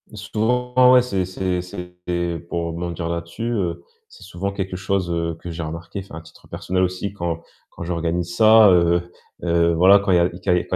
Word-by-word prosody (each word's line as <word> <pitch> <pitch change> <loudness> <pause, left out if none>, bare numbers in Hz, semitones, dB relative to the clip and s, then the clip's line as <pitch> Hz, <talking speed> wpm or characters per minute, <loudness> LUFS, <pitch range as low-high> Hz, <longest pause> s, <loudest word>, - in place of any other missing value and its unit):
Souvent 125 +4 +2
ouais, 125 - +7
c'est 100 -7 -1
c'est 90 0 -2
c'est 90 0 -9 0.5
pour 85 -1 -2
rebondir 85 0 -4
là-dessus, 85 +5 -5
heu, 90 -6 -2 0.3
c'est 485 - -15
souvent 100 +3 -4
quelque 95 -2 -4
chose, 95 -1 -1
heu, 85 -1 -2
que 85 - -6
j'ai 85 0 -5
remarqué, 85 +5 -6
enfin 95 - -12
à - - -8
titre 80 - -18
personnel 95 0 -1
aussi 95 +2 -2
quand 85 -4 -3 0.3
quand - - -9
j'organise 85 0 -2
ça, 110 +1 +7
heu 85 -1 +3 0.4
heu, 85 -1 +2
voilà 95 +4 +6
quand 100 -1 -1
il - - +5
y - - +4
a 85 - +4
que 90 - -10
quand 95 +1 -2
il 90 +1 0
90 Hz, 200 wpm, -21 LUFS, 85-100 Hz, 0.5 s, ouais